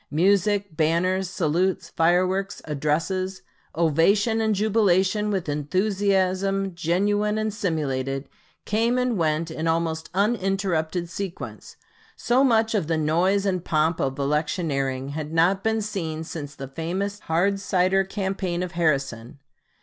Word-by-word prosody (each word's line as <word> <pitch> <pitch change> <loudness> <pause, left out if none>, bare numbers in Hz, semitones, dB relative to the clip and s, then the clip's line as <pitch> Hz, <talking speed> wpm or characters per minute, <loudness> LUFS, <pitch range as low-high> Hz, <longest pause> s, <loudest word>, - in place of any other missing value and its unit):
Music, 200 +2 +2
banners, 175 +4 +1
salutes, 180 +1 0
fireworks, 185 +4 +1
addresses, 165 +6 -1 0.3
ovation, 195 +8 +3
and 220 -1 +1
jubilation 210 -1 +2
with 190 -5 -2
enthusiasm 190 +4 0
genuine 205 +5 +1
and 215 -1 -1
simulated, 135 -8 -2 0.4
came 230 +4 +1
and 250 -2 +1
went 165 -2 0
in 160 +1 -3
almost 160 -1 -1
uninterrupted 190 -5 0
sequence; 185 +1 -7 0.4
so 250 +3 +2
much 225 -4 +3
of 200 -8 0
the 165 -1 +1
noise 175 +6 +2
and 185 -3 0
pomp 160 +1 +1
of 135 0 -1
electioneering 140 -2 -1
had 150 +1 -5
not 175 +4 +2
been 220 -1 +1
seen 165 -7 -4
since 145 -3 -7
the 135 - -7
famous 185 +8 -3
hard 195 +4 0
cider 190 0 +2
campaign 190 -2 -2
of 180 - -5
Harrison. 140 -7 -1
185 Hz, 125 wpm, -24 LUFS, 160-200 Hz, 0.4 s, ovation